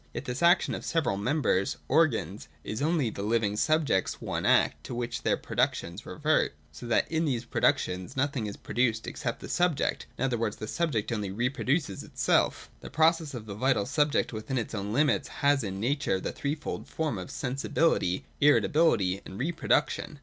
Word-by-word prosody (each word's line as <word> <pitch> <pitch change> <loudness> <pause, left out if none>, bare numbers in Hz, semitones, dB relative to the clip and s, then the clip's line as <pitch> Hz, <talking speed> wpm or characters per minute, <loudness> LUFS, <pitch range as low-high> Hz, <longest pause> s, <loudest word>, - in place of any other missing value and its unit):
Yet - - -4
this 125 +1 -4
action 175 +2 +4
of - - -4
the - - -8
several 160 -10 +1
members 105 -3 0
(organs) 130 - +1 0.2
is 110 - -4
only 150 -6 +1
the 100 - -6
living 105 -1 +1
subject's 150 -5 +1
one - - -2
act - - +3
to - - -5
which 120 0 -3
their - - +1
productions 85 +1 -2
revert; - - +1 0.2
so 120 - -9
that 120 - +2
in 160 0 +1
these 125 -5 -1
productions 90 +1 0
nothing 130 -5 0
is 100 - -6
produced 115 -2 0
except 120 -5 -4
the - - -7
sub 175 -3 +2
ject: - - -2
in - - -2
other 125 -3 0
words, 110 -2 -1
the 110 - -6
subject 130 -8 -1
only 105 -4 -2
reproduces 125 - -1
itself. - - +1
The - - -9
process 160 -2 +2
of 115 -3 -7
the 105 - -6
vital 115 -1 +1
subject 145 0 +1
within 110 +5 -3
its 115 - -3
own 100 -1 -3
limits 145 +6 +2
has 140 -2 +1
in 95 -2 -4
Nature 120 -4 0
the - - -3
threefold 150 +2 -4
form 155 -10 -2
of 90 - -6
Sensibilitj^, 130 - 0 0.2
Irritability, 145 - +3
and 95 - -9
Reproduction. 150 +1 0
125 Hz, 180 wpm, -28 LUFS, 105-150 Hz, 0.2 s, action